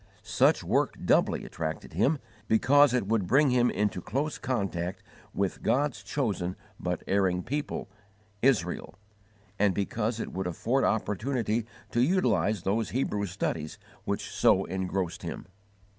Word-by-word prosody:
Such - - +3
work - - +1
doubly - - +3
attracted 80 -1 -5
him, 130 - +2 0.3
because 140 +5 +5
it 125 -4 +1
would 105 -3 0
bring 140 +4 +4
him 125 -1 +4
into 100 -2 -1
close 140 - -2
contact 100 -9 -2 0.3
with 100 -1 -2
God's 135 -5 +1
chosen 100 -6 -2 0.2
but - - -2
erring 95 -2 +1
people, 145 +3 -3 0.5
Israel; 100 -9 +1 0.6
and 100 -3 +3
because 110 +3 -1
it - - -4
would 95 0 -2
afford 120 +10 0
opportunity 110 +1 0 0.2
to 120 - +2
utilize 125 - +2
those 110 +3 0
Hebrew 105 -5 -1
studies 80 -4 -3 0.3
which - - -2
so - - +4
engrossed 95 -1 -2
him. - - -6
105 Hz, 130 wpm, -28 LUFS, 95-130 Hz, 0.6 s, because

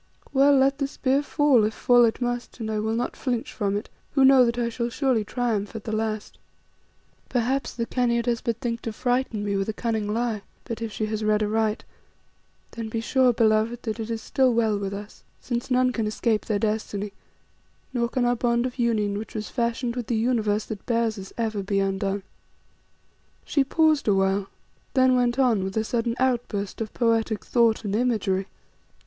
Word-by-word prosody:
Well, 280 +1 +5
let 270 +1 +3
the 275 - 0
spear 275 0 +1
fall, 290 -5 +3
if 215 +1 0
fall 245 -1 +5
it 225 - 0
must, 245 0 -3
and 220 -1 -3
I 215 - -1
will 220 +1 -1
not 240 +2 -2
flinch 245 -3 -3
from 205 -2 -1
it 205 - -5 0.3
who 270 -2 +5
know 265 -1 +7
that 235 0 -1
I 240 -1 0
shall 235 0 -2
surely 250 -3 +1
triumph 225 -2 -2
at 220 - -6
the 220 - -4
last. 215 -1 -3 0.9
Perhaps 250 +1 -1
the 230 -1 -1
Khania 235 -1 +1
does 235 -1 0
but 230 -2 -1
think 235 -3 -3
to 225 - -4
frighten 245 -3 -1
me 200 -1 -1
with 195 +2 -1
a - - -1
cunning 220 -2 -2
lie, 225 -1 -1 0.2
but 230 -2 -6
if 225 -1 -3
she 215 +2 -2
has 215 0 -3
read 215 0 +2
aright, 215 0 0 0.9
then 225 -1 -5
be 225 - -2
sure, 255 +2 +3
beloved, 225 +1 +2
that 220 -1 -3
it 225 0 -4
is 225 -1 -3
still 260 -2 +2
well 225 -2 +2
with 195 -1 -3
us, 205 +1 -8 0.2
since 240 0 -3
none 255 0 +3
can 225 -3 -1
escape 215 0 0
their 215 - +1
destiny, 210 -1 -2 0.8
nor 235 -2 0
can 255 -1 0
our 245 0 +2
bond 235 0 +1
of 255 0 -5
union 210 -4 +1
which 220 - -9
was 215 -1 -4
fashioned 235 0 -1
with 245 -3 -4
the 235 - 0
universe 220 -3 +1
that 210 -2 -7
bears 230 -3 0
us, 190 0 -9
ever 220 -3 -1
be 195 0 0
undone." 195 0 -1 1.2
She 280 - +2
paused 310 0 +2
awhile 195 0 +2 0.5
then 260 -1 +5
went 245 0 +2
on 240 -7 +3
with 190 +2 -4
a 220 - +2
sudden 230 +1 -1
outburst 235 -6 -1
of 220 - -3
poetic 225 -2 +1
thought 230 -2 +2
and 200 0 -1
imagery. 210 -5 0
230 Hz, 195 wpm, -25 LUFS, 215-245 Hz, 1.2 s, know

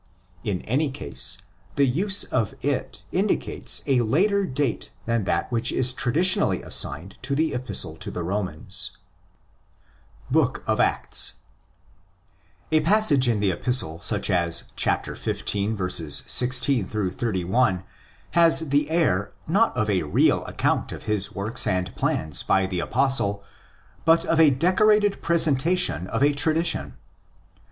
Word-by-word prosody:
In 95 -4 -3
any 140 +7 -1
case, 70 - 0 0.4
the 140 - +3
use 190 +10 +2
of 115 -6 -2
it - - -3
indicates - - 0
a 130 -3 +2
later 190 - +1
date 135 -3 -2 0.2
than 115 -3 -1
that - - -2
which 120 0 +1
is 125 0 +2
traditionally 155 +9 +2
assigned 80 +8 -1
to 140 +2 -3
the 155 +1 0
Epistle 125 +1 0
to - - -6
the 90 - -5
Romans. 95 0 -4 1.3
Books - - +1
of - - -1
Acts. - - +1 1.4
A 155 - +4
passage 165 -7 +4
in 110 -3 0
the 100 -2 +1
Epistle 85 -4 +1
such - - -1
as 85 -2 +1
xv. 95 -7 -1
16 125 -2 +2
31 95 0 -1 0.5
has 165 -2 +3
the 145 +2 +1
air, 105 - 0
not 205 +8 +1
of 110 - 0
a 95 -4 +1
real 75 -2 +1
account - - -1
of - - -8
his 105 -2 0
work 105 +3 -4
and 90 0 -2
plans 75 -2 0
by 95 0 +1
the 95 -1 -3
Apostle, 100 -3 0 0.6
but 165 +1 +3
of 165 - 0
a 160 -2 +7
decorated 200 +8 +2
presentation 165 - +2
of 115 +7 -1
a 145 +1 +3
tradition. 150 - 0
125 Hz, 130 wpm, -23 LUFS, 95-155 Hz, 1.4 s, a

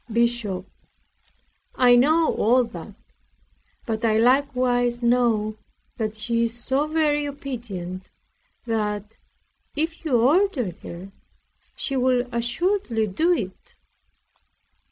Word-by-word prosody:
BISHOP 230 -5 0 1.1
I 245 -1 +6
know 310 +6 +4
all 245 +4 +3
that; 200 -2 -9 0.9
but 225 -1 -3
I 220 -1 +3
likewise 245 -1 +2
know 230 -3 +2 0.4
that 220 -2 -2
she 230 +2 -1
is 230 0 0
so 270 +4 0
very 300 -2 +1
obedient, 225 -10 -6 0.6
that, 210 -2 -3 0.6
if 325 +3 -2
you 265 -7 +2
order 280 - +2
her, 180 +3 -9 0.6
she 275 - -2
will 255 -1 +2
assuredly 240 - 0
do 215 - +1
it. 195 - -3
240 Hz, 100 wpm, -24 LUFS, 220-275 Hz, 1.1 s, I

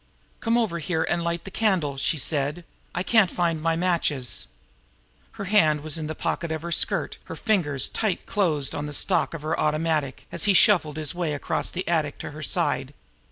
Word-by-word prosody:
"Come 230 0 +1
over 215 -8 0
here 160 0 -1
and 170 0 -1
light 170 0 -2
the 195 - -8
candle," 185 -10 +1
she 140 +3 0
said. 150 +3 -1 0.3
"I 180 - 0
can't 215 -3 +4
find 170 -3 -1
my 165 0 +1
matches." 165 -7 0 0.9
Her 200 - -6
hand 160 -7 +3
was 155 0 -4
in 155 - -4
the 155 - -4
pocket 170 +1 -2
of 160 0 -3
her 170 - -5
skirt - - +1
now, - - -31
her - - -6
fingers 155 - +1
tight 215 -5 -2
closed 155 -9 +1
on 145 0 -3
the 150 - -6
stock - - +2
of 155 - -8
her 155 +2 -1
automatic, 155 -2 0
as - - -1
he 200 -2 +4
shuffled 165 -7 +5
his 155 +1 -1
way 170 -4 -2
across 145 - -1
the 185 +1 -4
attic 155 -4 0
to - - -6
her 150 +1 -9
side. 140 -2 -1
165 Hz, 205 wpm, -25 LUFS, 150-180 Hz, 0.9 s, shuffled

